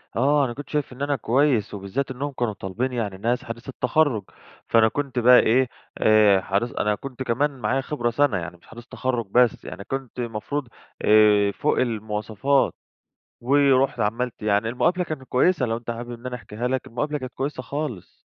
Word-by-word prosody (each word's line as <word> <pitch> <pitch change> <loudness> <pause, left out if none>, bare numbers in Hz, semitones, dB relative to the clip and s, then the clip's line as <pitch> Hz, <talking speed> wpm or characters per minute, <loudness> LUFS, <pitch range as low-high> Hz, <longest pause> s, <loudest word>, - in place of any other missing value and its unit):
آه، 140 +3 +3
أنا 120 - -4
كنت 145 +2 -9
شايف 150 -4 -2
إن 130 - -12
أنا 145 0 +1
كويس، 125 -3 +1
وبالذات 105 +8 -3
إنّهم 140 +3 -4
كانوا 120 -5 -2
طالبين 115 +7 -3
يعني 105 -5 -3
ناس 120 +4 -1
حديثي 120 +3 -8
التَخرُّج. 125 -3 +1 0.4
فأنا 115 -1 +5
كنت 135 0 -2
بقى 125 +1 +7
إيه، 125 +3 +3 0.3
آآ 105 -3 +5
حديث 100 +5 -1
أنا 105 0 +1
كنت 130 +2 -7
كمان 135 +3 0
معايا 135 +2 0
خِبرة 125 -4 -2
سنة. 140 -1 +2
يعني 90 0 -6
مش - - -25
حديث 120 +1 -12
تَخرُّج 125 -3 -2
بس، 125 -2 +3
يعني 100 - -7
كنت 135 +1 -6
المفروض 120 +4 -3 0.3
آآ 105 -1 +5
فوق 150 - 0
المواصفات. 110 +3 0 0.7
ورُحت 135 +1 +3
عملت 115 +2 -2
يعني 105 +1 +1
المقابلة 175 +9 +1
كانت 155 -5 -5
كويسة، 130 +2 +2
لو 115 0 -1
أنت 120 0 -6
حابب 120 +1 -6
إن 120 +2 -9
أنا 125 -1 -4
أحكيها 120 +1 -5
لك، 130 0 -2
المقابلة 145 +6 -2
كانت 130 -1 -7
كويسة 135 -1 -3
خالص. 135 - -5
125 Hz, 180 wpm, -24 LUFS, 110-135 Hz, 0.7 s, بقى